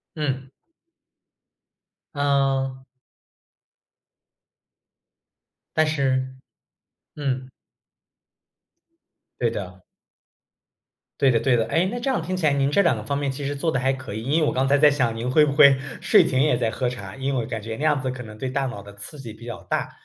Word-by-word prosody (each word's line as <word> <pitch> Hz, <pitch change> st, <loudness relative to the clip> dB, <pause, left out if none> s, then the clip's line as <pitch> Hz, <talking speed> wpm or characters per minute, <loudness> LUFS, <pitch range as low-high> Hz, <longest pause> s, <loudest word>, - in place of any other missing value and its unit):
嗯。 135 Hz, -4 st, -3 dB, 1.6 s
嗯。 135 Hz, -2 st, 0 dB, 2.9 s
但 155 Hz, 0 st, +4 dB
是 130 Hz, -3 st, 0 dB, 0.8 s
嗯。 130 Hz, -3 st, -3 dB, 1.9 s
对 120 Hz, -, +2 dB
的。 95 Hz, -3 st, -7 dB, 1.4 s
对 135 Hz, -, +5 dB
的 115 Hz, -2 st, +2 dB
对 130 Hz, -3 st, +3 dB
的。 115 Hz, -1 st, +1 dB
诶， 160 Hz, +10 st, +1 dB
那 235 Hz, +6 st, -3 dB
这 270 Hz, -, -1 dB
样 255 Hz, -, 0 dB
听 185 Hz, +3 st, -3 dB
起 175 Hz, -4 st, 0 dB
来 145 Hz, -, +4 dB
您 140 Hz, 0 st, +1 dB
这 180 Hz, +7 st, +4 dB
2 170 Hz, -, +3 dB
个 -, -, -6 dB
方 140 Hz, -1 st, -2 dB
面 140 Hz, -1 st, -1 dB
其 135 Hz, +2 st, -6 dB
实 145 Hz, -, -2 dB
做 160 Hz, +4 st, 0 dB
得 135 Hz, -, 0 dB
还 135 Hz, +1 st, +2 dB
可 130 Hz, -5 st, -7 dB
以。 110 Hz, -, -4 dB
因 150 Hz, +6 st, +2 dB
为 155 Hz, -, +2 dB
我 -, -, +1 dB
刚 130 Hz, +1 st, +1 dB
才 140 Hz, +1 st, +4 dB
在 150 Hz, +1 st, +7 dB
想 130 Hz, -5 st, 0 dB
您 120 Hz, +2 st, -2 dB
会 150 Hz, +4 st, +5 dB
不 145 Hz, -, 0 dB
会 140 Hz, -1 st, +7 dB, 0.2 s
睡 -, -, +5 dB
前 130 Hz, 0 st, +1 dB
也 150 Hz, -4 st, +3 dB
在 120 Hz, -2 st, 0 dB
喝 125 Hz, +2 st, -1 dB
茶， 100 Hz, -6 st, -7 dB
因 135 Hz, +1 st, -2 dB
为 120 Hz, -3 st, -1 dB
感 110 Hz, -1 st, -5 dB
觉 110 Hz, +1 st, -5 dB
那 150 Hz, -, -4 dB
样 150 Hz, -3 st, +3 dB
子 130 Hz, 0 st, -2 dB
可 130 Hz, -1 st, -6 dB
能 110 Hz, -2 st, -11 dB
对 130 Hz, -, -3 dB
大 135 Hz, 0 st, -1 dB
脑 120 Hz, -6 st, -6 dB
的 100 Hz, 0 st, -13 dB
刺 100 Hz, +9 st, -10 dB
激 120 Hz, -5 st, -8 dB
比 110 Hz, +2 st, -14 dB
较 120 Hz, -, -7 dB
大。 -, -, -2 dB
135 Hz, 195 characters per minute, -23 LUFS, 120-145 Hz, 2.9 s, 在